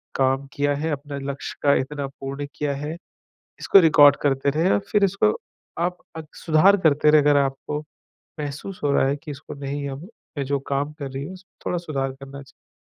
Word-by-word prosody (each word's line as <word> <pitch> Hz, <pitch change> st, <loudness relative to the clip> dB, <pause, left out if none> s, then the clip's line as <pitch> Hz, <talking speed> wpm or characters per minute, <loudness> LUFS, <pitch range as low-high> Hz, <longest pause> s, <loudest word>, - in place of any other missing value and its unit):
काम 135 Hz, +1 st, +1 dB
किया 145 Hz, 0 st, +1 dB
हैं, 155 Hz, +3 st, -2 dB
अपने 145 Hz, 0 st, -5 dB
लक्ष्य 140 Hz, -, -7 dB
का 140 Hz, -1 st, +5 dB
इतना 140 Hz, +1 st, -5 dB
पूर्ण 140 Hz, +1 st, -6 dB
किया 145 Hz, -1 st, -1 dB
हैं। 150 Hz, +4 st, -5 dB, 0.6 s
इसको 195 Hz, -, +6 dB
रिकॉर्ड 145 Hz, -4 st, +7 dB
करते 135 Hz, 0 st, +2 dB
रहें 165 Hz, +6 st, +1 dB
और -, -, +3 dB
फ़िर 210 Hz, -1 st, +3 dB
इसको 200 Hz, -, +3 dB, 0.5 s
आप 180 Hz, +1 st, -1 dB, 0.2 s
अग 160 Hz, -1 st, -7 dB, 0.2 s
सुधार 170 Hz, +5 st, +5 dB
करते 150 Hz, -4 st, +3 dB
रहे 155 Hz, -1 st, +6 dB
अगर 145 Hz, 0 st, +4 dB
आपको 140 Hz, +2 st, -1 dB, 0.6 s
महसूस 150 Hz, +6 st, -6 dB
हो 145 Hz, -, +2 dB
रहा -, -, +3 dB
हैं 140 Hz, -, 0 dB
कि 150 Hz, -, -6 dB
इसको 140 Hz, 0 st, -9 dB
नहीं 140 Hz, 0 st, -4 dB
हम 140 Hz, +7 st, -7 dB, 0.3 s
मैं 140 Hz, -, -1 dB
जो 140 Hz, 0 st, 0 dB
काम 140 Hz, +2 st, 0 dB
कर 135 Hz, -2 st, -5 dB
रही 135 Hz, +1 st, -5 dB
हूँ, 185 Hz, -, -7 dB
उस 185 Hz, 0 st, -14 dB, 0.2 s
थोड़ा 175 Hz, -, 0 dB
सुधार 140 Hz, -6 st, -3 dB
करना 135 Hz, +1 st, -10 dB
चाहिए। 135 Hz, -, -21 dB
145 Hz, 200 wpm, -23 LUFS, 140-155 Hz, 0.6 s, रिकॉर्ड